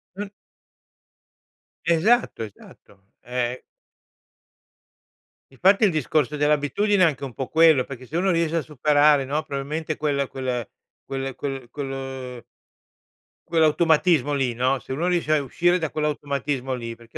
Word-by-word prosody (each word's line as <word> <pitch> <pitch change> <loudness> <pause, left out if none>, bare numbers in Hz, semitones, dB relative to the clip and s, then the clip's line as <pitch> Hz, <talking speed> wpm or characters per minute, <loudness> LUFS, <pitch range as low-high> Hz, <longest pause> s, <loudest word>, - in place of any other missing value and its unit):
Un 205 +1 -5 1.6
Esatto, 170 - +2
esatto. 100 -2 -15
Ehm 125 0 -3 1.9
Infatti, 190 - +3
il 200 - +5
discorso 150 -1 0
dell'abitudine 150 +8 +2
è - - +8
anche 140 -4 -1
un 130 - -8
po' 135 - -4
quello, 160 -5 +5
perché 130 -2 -9
se 160 - -3
uno 190 +1 +2
riesce 165 -1 +1
a - - +1
superare, 150 -1 +3
no, 150 +4 -1
probabilmente 150 +2 -4
quel 140 -2 0
quel 125 -4 -3 0.4
quel 135 -1 -4
quel 135 -4 -5
quel 135 -3 -6 1.0
quell'automatismo 160 -2 +3
lì, 135 -3 0
no, 130 +3 +1
se 130 - -7
uno 165 +6 -1
riesce 170 -4 +1
a 145 - 0
uscire 175 +7 +2
da 160 -3 -2
quell'automatismo 140 -3 -2
lì 115 -2 -6
perché 115 0 -13
145 Hz, 135 wpm, -23 LUFS, 130-160 Hz, 1.9 s, è